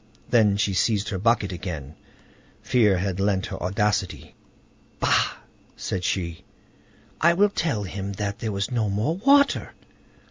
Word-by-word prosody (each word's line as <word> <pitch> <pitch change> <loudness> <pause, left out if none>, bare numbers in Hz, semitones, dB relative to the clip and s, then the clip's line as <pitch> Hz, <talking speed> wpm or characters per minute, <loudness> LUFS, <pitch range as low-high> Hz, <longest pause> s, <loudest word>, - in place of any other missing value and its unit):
Then 105 -4 +4
she 100 -2 0
seized 105 +2 +1
her 95 -5 -3
bucket 105 -2 +2
again; 85 -6 -6 0.7
fear 105 -6 +3
had 95 0 -2
lent 95 -1 +1
her - - -7
audacity. 100 +2 -1 0.7
"Bah!" - - +2 0.4
said 90 - -4
she; 85 -3 -2 0.8
"I 170 +1 +5
will 205 +3 +4
tell 145 - -1
him 100 +1 -5
that 100 0 -4
there 110 - -3
was 100 +4 -2
no 115 -4 0
more 110 - -1
water!" 280 +6 +3
100 Hz, 140 wpm, -24 LUFS, 95-115 Hz, 0.8 s, I